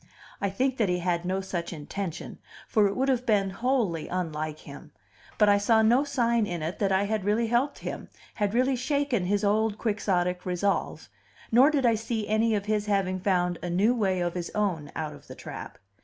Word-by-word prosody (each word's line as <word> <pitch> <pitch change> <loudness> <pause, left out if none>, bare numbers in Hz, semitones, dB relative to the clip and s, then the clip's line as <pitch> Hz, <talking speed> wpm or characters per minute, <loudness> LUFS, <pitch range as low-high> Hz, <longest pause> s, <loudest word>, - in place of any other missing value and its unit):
I 200 - +1
think 260 +7 0
that 215 -5 +1
he 180 - +1
had 175 -1 -1
no 190 +1 -1
such 175 -3 -4
intention, 170 +2 -6 0.3
for 215 -3 +3
it 200 - -3
would 265 +1 0
have 255 -2 +1
been 205 -5 +2
wholly 225 - 0
unlike 155 -4 -3
him; - - -12 0.4
but 210 - +5
I 200 0 +5
saw 220 +2 +3
no 240 +5 +4
sign 235 -5 +1
in 175 -4 -4
it 165 +3 -4
that 195 -2 +1
I 190 +1 +3
had 210 0 -1
really 210 +4 +1
helped 240 +5 +1
him, - - -6 0.2
had 205 0 -1
really 260 +2 +3
shaken 260 -5 0
his 205 +2 0
old 210 +1 +1
quixotic 185 -5 0
resolve, 185 +2 -1 0.4
nor 255 +5 +6
did 285 -4 +1
I 235 - +5
see 220 -1 -3
any 220 +1 +2
of 200 -1 -2
his 210 0 -1
having 190 -2 0
found 180 -2 0
a 175 - -4
new 200 +7 +3
way 190 -6 0
of 175 -1 -1
his 175 -2 -4
own 180 -8 -1
out 155 -1 -3
of - - -15
the - - -9
trap. - - -8
205 Hz, 205 wpm, -27 LUFS, 180-230 Hz, 0.4 s, nor